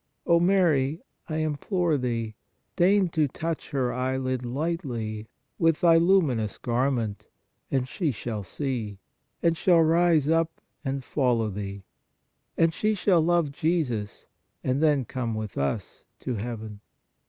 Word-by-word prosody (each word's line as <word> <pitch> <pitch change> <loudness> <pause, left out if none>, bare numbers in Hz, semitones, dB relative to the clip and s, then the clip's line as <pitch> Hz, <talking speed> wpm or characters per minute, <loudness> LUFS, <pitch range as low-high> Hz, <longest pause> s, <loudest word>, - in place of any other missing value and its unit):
O 170 0 +5
Mary, 165 -6 +3 0.3
I 155 - -2
implore 160 +2 0
thee, 115 -4 -2 0.4
deign 190 +1 +4
to 160 -3 +1
touch 165 +4 -4
her 130 -4 0
eye 130 +1 -1
lid 130 -1 -2
lightly 120 - -3 0.3
with 165 -1 +3
thy 165 -2 +6
luminous 160 - +2
garment, 120 -3 -1 0.4
and 130 -2 0
she 155 +3 -1
shall 110 -2 -4
see, 115 -3 -4 0.5
and 165 -1 +3
shall 170 0 +4
rise 165 -2 +3
up 165 +1 +1 0.2
and 135 -1 -2
follow 120 -6 +1
thee; 100 0 -6 0.7
and 165 0 +3
she 215 +4 +1
shall 180 -3 +3
love 170 -2 +2
Jesus 140 -10 -1 0.4
and 130 +3 0
then 145 -5 +3
come 115 -1 -3
with 110 -2 -5
us 70 -1 -3 0.2
to 130 - -3
heaven." 110 -2 -5
140 Hz, 135 wpm, -26 LUFS, 115-165 Hz, 0.7 s, thy